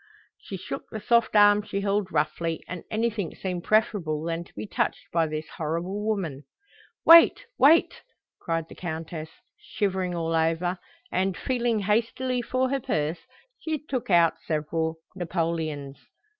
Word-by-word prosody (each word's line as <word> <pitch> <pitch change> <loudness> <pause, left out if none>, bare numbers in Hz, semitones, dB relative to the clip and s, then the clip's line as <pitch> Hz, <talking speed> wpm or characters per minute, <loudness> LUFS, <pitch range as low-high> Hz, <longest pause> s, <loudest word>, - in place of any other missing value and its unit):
She - - -7
shook - - -7
the 220 - -5
soft 235 +1 +2
arm 205 0 +7
she 200 -1 -4
held 200 -1 0
roughly, 160 +2 -1
and 180 -2 -6
anything 220 -4 -1
seemed 180 -2 -4
preferable 190 -8 +1
than 165 0 -2
to - - -21
be - - -5
touched - - -2
by 165 -1 +2
this 155 0 -4
horrible 170 +6 -2
woman. 180 -10 -2 0.6
"Wait, 335 +8 +8
wait!" 315 +5 +5 0.4
cried 165 -1 -2
the - - -12
Countess, 160 -2 -5 0.3
shivering 190 -4 -2
all 165 -1 -1
over, 165 +3 +1 0.3
and, 185 0 0
feeling 240 -4 0
hastily 235 +5 0
for 255 +1 0
her 275 - +1
purse, 160 - -2 0.3
she 315 -1 -2
took 270 -6 -4
out 170 -3 +4
several 160 +1 -1 0.2
napoleons. 160 -5 -3
180 Hz, 145 wpm, -26 LUFS, 165-215 Hz, 0.6 s, Wait